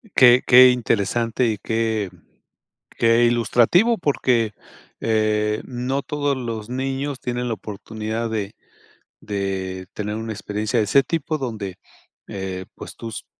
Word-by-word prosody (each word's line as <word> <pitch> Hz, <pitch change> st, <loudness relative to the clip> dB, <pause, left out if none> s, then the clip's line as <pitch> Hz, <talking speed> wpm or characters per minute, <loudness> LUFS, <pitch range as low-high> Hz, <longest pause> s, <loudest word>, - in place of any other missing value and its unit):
Qué 125 Hz, -1 st, +7 dB
qué 130 Hz, 0 st, +9 dB
interesante 115 Hz, 0 st, 0 dB
y 110 Hz, -2 st, 0 dB
qué 110 Hz, -1 st, -1 dB, 0.9 s
qué 115 Hz, +1 st, +4 dB
ilustrativo 120 Hz, -, +3 dB
porque 125 Hz, -, +1 dB, 0.5 s
eh, 110 Hz, -1 st, +1 dB
no 130 Hz, +2 st, -2 dB
todos 145 Hz, -2 st, -1 dB
los 115 Hz, -3 st, -5 dB
niños 135 Hz, +2 st, -3 dB
tienen 125 Hz, 0 st, -3 dB
la 115 Hz, -, -1 dB
oportunidad 110 Hz, +3 st, -5 dB
de 105 Hz, -3 st, -3 dB, 0.7 s
de 95 Hz, -2 st, -4 dB
tener 105 Hz, 0 st, -4 dB
una 110 Hz, 0 st, -4 dB
experiencia 105 Hz, +3 st, -2 dB
de 105 Hz, -, +2 dB
ese 135 Hz, +7 st, +4 dB
tipo, 155 Hz, 0 st, -2 dB
donde, 110 Hz, -8 st, -5 dB, 0.5 s
eh, 95 Hz, -2 st, -5 dB
pues -, -, -10 dB
tus 115 Hz, -2 st, -7 dB
115 Hz, 125 wpm, -22 LUFS, 105-125 Hz, 0.9 s, qué